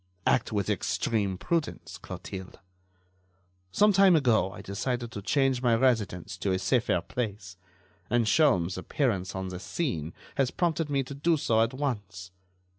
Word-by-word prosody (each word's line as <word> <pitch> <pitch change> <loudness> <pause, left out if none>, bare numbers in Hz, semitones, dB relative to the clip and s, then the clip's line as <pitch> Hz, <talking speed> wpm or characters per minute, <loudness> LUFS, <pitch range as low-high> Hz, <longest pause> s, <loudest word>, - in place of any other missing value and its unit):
"Act - - +2
with 100 -3 -1
extreme 100 -5 0
prudence, 165 - -3
Clotilde. 95 -1 -8 1.1
Some 210 - +4
time 195 -2 +6
ago 120 -10 +3
I - - -10
decided 120 +4 -3
to 100 - -6
change 135 +3 +1
my 120 -2 +3
residence 110 -8 0
to 100 - -1
a 95 - +2
safer 115 -3 +1
place, 100 -3 -5 0.5
and 120 -1 +2
Sholmes' 95 - +3
appearance 100 -4 -1
on 95 0 -3
the 90 -1 -6
scene 90 - -3 0.2
has 135 -3 +2
prompted 165 -2 -1
me 140 -1 +1
to 135 - -8
do 160 +4 +1
so 115 -5 +2
at 115 +3 0
once. 100 -9 -4
115 Hz, 150 wpm, -28 LUFS, 95-140 Hz, 1.1 s, time